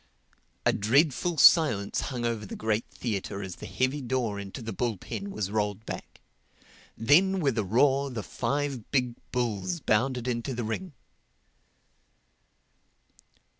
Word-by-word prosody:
A - - +4
dreadful 140 - +2
silence 130 - +5
hung 125 -3 -3
over 115 -2 -1
the 100 - -7
great 110 0 -1
theatre 100 -3 -4
as 95 -2 -7
the - - -8
heavy 130 +3 0
door 120 -5 -1
into 100 +5 -7
the 110 -1 -4
bull 115 0 -1
pen 200 - -6
was 105 - -3
rolled 105 0 -1
back. - - -8 0.8
Then 180 - +4
with 140 -8 +1
a 110 - +1
roar 135 +7 +3
the 115 -5 -5
five 140 +2 -2
big 125 -3 +1 0.2
bulls 125 - -1
bounded 125 0 +1
into 120 +1 -2
the 120 - -2
ring. 145 +11 -4
120 Hz, 135 wpm, -28 LUFS, 105-140 Hz, 0.8 s, silence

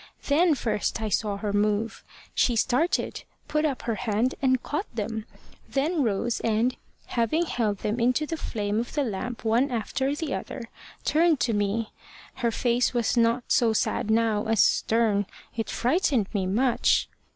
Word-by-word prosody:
Then 315 +2 +4
first 225 -3 -1
I 220 -1 -2
saw 205 0 0
her 205 0 -3
move. 210 +2 0 0.3
She 240 - +2
started, 265 - +1 0.2
put 305 0 +1
up 280 -4 -2
her 230 - -1
hand, 225 +3 0
and 260 -2 +2
caught 300 +8 -3
them; 220 0 -3 0.4
then 300 +4 0
rose 230 0 0
and, 230 +3 +1 0.3
having 240 +9 0
held 220 -9 -1
them 215 +3 0
into 250 +6 +2
the 325 - -3
flame 210 -8 -2
of 240 +4 -4
the 290 - +2
lamp 230 +1 -4
one 235 +5 +3
after 265 +4 -1
the 295 -2 -3
other, 255 - -5 0.4
turned 320 -1 +3
to 235 - +1
me. 205 +2 -1 0.5
Her 240 -2 +1
face 240 +2 +1
was 235 -1 +1
not 235 +1 +3
so 230 -2 +3
sad 215 - 0
now 220 -1 +2
as 220 -5 +4
stern. 220 -3 +2 0.3
It 225 -1 -3
frightened 255 - +1
me 195 -3 0
much. 235 +6 +2
235 Hz, 160 wpm, -26 LUFS, 215-265 Hz, 0.5 s, Then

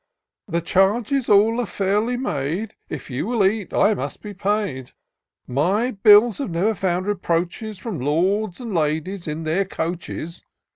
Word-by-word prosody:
" - - -67
The 170 - +2
charges 210 - +1
all 220 +4 +4
are 235 - -3
fairly 205 +6 0
made; 185 - -2 0.2
If 145 -3 -7
you 130 +9 -2
will 230 -4 +2
eat, 205 0 0
I 215 - +3
must - - -5
be 210 -1 -7
paid. 195 - -2 0.5
My 190 - +1
bills 210 +2 +6
have 275 - -2
never 180 +6 +1
found 185 -1 -1
reproaches 185 +2 -2
From 190 - -5
lords 180 +8 0
and 235 -4 -5
ladies, 165 +3 -1
in 155 +1 -4
their 160 +5 +1
coaches. 170 -2 -5
195 Hz, 155 wpm, -22 LUFS, 170-215 Hz, 0.5 s, bills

